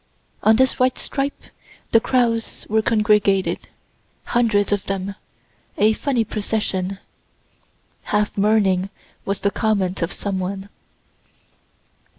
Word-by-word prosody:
On 220 - +5
this 260 +3 +2
white 255 0 +2
stripe 275 +1 -2 0.5
the 225 - +6
crows 230 -2 0
were 220 +1 +2
congregated, 210 -3 +2 0.6
hundreds 220 -4 +2
of 205 -2 +1
them 195 0 -2 0.6
a 215 +2 +4
funny 250 0 0
procession 200 -3 -2 1.1
("half 210 0 0
mourning" 195 -2 +2 0.4
was 200 0 -2
the 200 - +1
comment 200 -4 0
of 170 - -1
some 195 -2 -3
one.) 195 +2 -4
210 Hz, 110 wpm, -21 LUFS, 195-225 Hz, 1.1 s, the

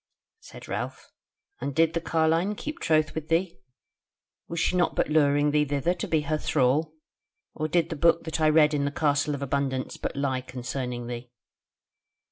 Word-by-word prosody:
Said - - -12
Ralph: - - -5 0.5
"And 140 - -4
did 165 +1 +3
the 170 - -1
carline 165 +5 +1
keep 300 +8 -6
troth 155 -1 +2
with 160 -1 -5
thee? 170 +2 0 0.9
Was 170 - -4
she 180 - +1
not 175 -1 +1
but - - +1
luring 145 -1 +3
thee 150 0 +3
thither 145 +4 0
to 180 - -5
be 160 -2 +1
her 155 +1 -1
thrall? 150 +4 +1 0.6
Or 155 - -2
did 165 +1 +1
the - - -2
book 170 +2 +3
that 160 0 -3
I 155 - +5
read 155 -1 +5
in 140 -1 0
the 145 - -1
Castle 145 0 +1
of 140 - -5
Abundance 135 -1 -2
but - - -4
lie 135 -2 -1
concerning 125 -1 -5
thee?" 120 0 -6
150 Hz, 180 wpm, -26 LUFS, 140-165 Hz, 0.9 s, I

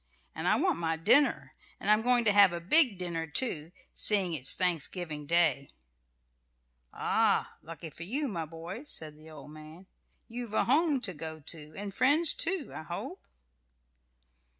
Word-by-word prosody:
And - - -5
I - - +3
want - - 0
my 165 -1 0
dinner. 240 - +3 0.3
And 205 - 0
I'm 215 +1 +4
going 245 0 +2
to 210 - +4
have 200 -2 +6
a 170 - -3
big 235 - +4
dinner, 170 -2 -4
too, 160 - -1 0.2
seeing 195 -5 +2
it's 135 -4 -2
Thanksgiving 170 -3 -3
Day." 155 -5 +1 1.2
"Ah! - - 0
lucky 165 0 -10
for 165 - -14
you, 265 - -2
my 170 -8 -4
boy!" 165 +7 -8
said 155 - -4
the 155 +1 -15
old 150 -1 -12
man. 155 +4 -13 0.4
"You've 235 -2 -6
a - - +2
home 290 +1 +1
to 205 -6 -3
go 160 0 -7
to, 155 0 -5
and 200 0 -6
friends, 290 - +4
too, 380 -7 0
I - - -7
hope?" 155 - -7
175 Hz, 160 wpm, -29 LUFS, 160-230 Hz, 1.2 s, have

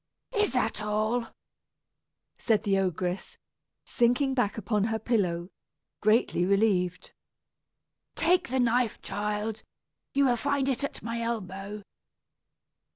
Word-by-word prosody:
"Is 420 - +2
that 225 -4 0
all?" 215 +3 0 1.1
said 220 -3 +2
the 195 -3 +2
ogress, 180 0 -2 0.5
sinking 245 +3 +2
back 245 -6 0
upon 210 -1 0
her 220 0 0
pillow, 190 -6 0 0.5
greatly 215 -4 +3
relieved. 190 -2 +1 1.0
"Take 350 +2 +3
the 260 +2 -1
knife, 240 -1 +2
child; 210 +1 -3 0.5
you 280 0 +4
will 245 -2 +3
find 280 +1 0
it 270 0 0
at 280 - -4
my 230 0 -3
elbow." 205 -2 -4
220 Hz, 110 wpm, -28 LUFS, 200-245 Hz, 1.1 s, you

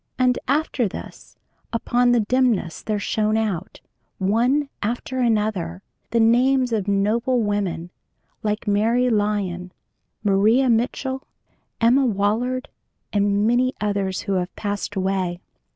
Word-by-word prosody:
And 250 -1 +2
after 280 -5 +1
this, - - -10 0.3
upon 245 +1 +2
the 240 -1 +4
dimness 230 -7 +1
there 215 -1 -2
shone 215 +1 0
out, 195 -5 -3 0.4
one 240 +9 +2
after 245 +4 -3
another, 210 -7 0 0.3
the 235 - +1
names 250 +2 +3
of 210 -3 -1
noble 225 +5 +1
women 195 -5 -2 0.5
like 210 +1 -2
Mary 230 +5 +2
Lyon, 200 -4 -1 0.5
Maria 220 +6 +4
Mitchell, 260 +3 -1 0.5
Emma 255 +4 +4
Willard, 230 +5 0 0.5
and 205 0 +2
many 250 +3 +2
others 200 -2 -1
who 200 - -2
have 180 - -7
passed 205 0 -3
away. 185 -2 -1
215 Hz, 120 wpm, -22 LUFS, 200-245 Hz, 0.5 s, the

